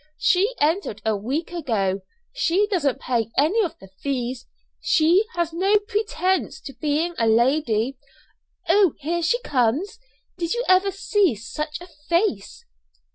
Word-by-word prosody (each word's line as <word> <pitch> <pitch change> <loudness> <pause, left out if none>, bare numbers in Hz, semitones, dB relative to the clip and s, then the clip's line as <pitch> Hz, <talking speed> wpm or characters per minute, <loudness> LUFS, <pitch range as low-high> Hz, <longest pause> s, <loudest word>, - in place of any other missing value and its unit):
She 400 +7 +2
entered 305 - 0
a 220 -1 +2
week 265 +12 -3
ago. 210 - -1 0.3
She 400 -4 +2
doesn't 290 -9 0
pay 230 -3 -1
any 365 +11 +3
of 335 -3 -4
the 195 - -15
fees; 255 -2 -3 0.3
she 330 +5 +3
has 340 -1 -1
no 385 +5 +3
pretence 410 -3 -1
to 275 - -9
being 310 +4 -1
a 230 - +2
lady. 235 +1 +2 0.7
Oh, 370 -1 +4
here 335 +4 -2
she 475 +9 +1
comes! 285 - 0 0.4
Did 340 +4 -1
you 480 - -1
ever 370 +2 +4
see 390 - +1
such 300 +8 -5
a 355 - -11 0.2
face?" 340 - 0
320 Hz, 140 wpm, -23 LUFS, 255-375 Hz, 0.7 s, Oh